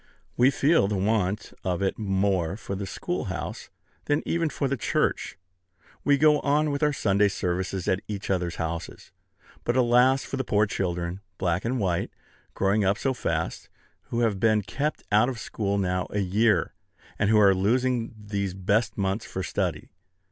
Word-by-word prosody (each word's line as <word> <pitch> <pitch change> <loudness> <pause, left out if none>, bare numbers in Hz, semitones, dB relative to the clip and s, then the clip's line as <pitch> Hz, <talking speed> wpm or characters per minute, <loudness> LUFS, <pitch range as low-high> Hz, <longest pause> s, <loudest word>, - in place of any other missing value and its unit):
We 125 +2 +5
feel 140 -4 +3
the 105 - -1
want 100 0 0
of 90 +1 -1
it 95 - -1
more 95 -3 0
for 100 - -6
the 100 0 -4
schoolhouse - - -4 0.4
than 145 +1 +1
even 165 -1 +1
for 140 - -1
the 140 - 0
church. 115 - -1 0.7
We 145 -1 +4
go 150 +1 +5
on 150 +1 +1
with 140 - -2
our 150 -1 +3
Sunday 100 -6 +2
services 95 -1 -2
at 95 - +2
each 100 -2 -4
other's 90 -2 -1
houses; 80 0 -5 0.5
but 120 - 0
alas 125 +2 +4
for 135 - -4
the 130 - -1
poor 105 -3 +2
children, 90 -2 -3 0.2
black 90 0 -1
and 125 +2 0
white, 90 -5 0 0.5
growing 100 +2 +2
up 100 +1 +2
so 135 +2 0
fast, 80 -9 -3 0.4
who 120 - -2
have 110 -5 +1
been 110 -1 +3
kept 145 +9 -3
out 110 +4 +4
of 130 - -4
school 100 -2 -2
now 90 -2 0
a 105 - -2
year, 105 +4 +2 0.5
and 105 - +2
who 110 - +5
are 100 -2 +6
losing 115 +4 0
these 100 -3 -3
best 105 +3 0
months 95 +2 -1
for 95 - -4
study! - - -2
105 Hz, 170 wpm, -26 LUFS, 95-120 Hz, 0.7 s, are